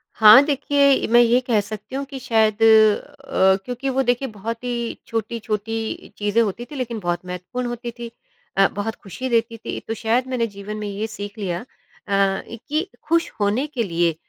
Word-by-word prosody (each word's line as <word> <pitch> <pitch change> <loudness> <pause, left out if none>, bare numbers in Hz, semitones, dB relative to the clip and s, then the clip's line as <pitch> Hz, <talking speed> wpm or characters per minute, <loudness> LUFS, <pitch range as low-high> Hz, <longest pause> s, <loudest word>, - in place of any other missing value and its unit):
हाँ, 215 +4 +9
देखिए 285 0 0
ए, - - 0
मैं 240 +2 +6
ये 240 +1 +4
कह 225 -3 +3
सकती 215 +5 -8
हूँ 275 - -2
कि 270 -1 -8
शायद 220 -3 +1
अ, 220 -1 +4
क्योंकि 250 +2 -3
वो 265 0 +1
देखिए 245 +2 +1
बहुत 230 +1 -6
ही 240 -1 -2
छोटी-छोटी 225 0 -3
चीज़ें 205 +2 +2
होती 230 +2 -2
थी - - -7
लेकिन 240 -4 -3
बहुत 175 -1 -2
महत्वपूर्ण 180 +8 -5
होती 240 0 -5
थी 235 -1 -6 0.5
अ, 195 - +6
बहुत 205 +2 -4
ख़ुशी 255 +7 -5
देती 230 -1 +1
थी। - - -5
तो 225 - -1
शायद 235 +3 0
मैंने 245 -3 0
जीवन 200 +1 -7
में 210 -1 -4
ये 205 +2 -3
सीख 205 0 -8
लिया 180 -4 -2
अ, - - -12 0.4
कि 220 - -1 0.2
ख़ुश 335 0 +2
होने 210 +8 +1
के 255 -6 -2
लिए 170 -3 +1
225 Hz, 185 wpm, -22 LUFS, 205-245 Hz, 0.5 s, हाँ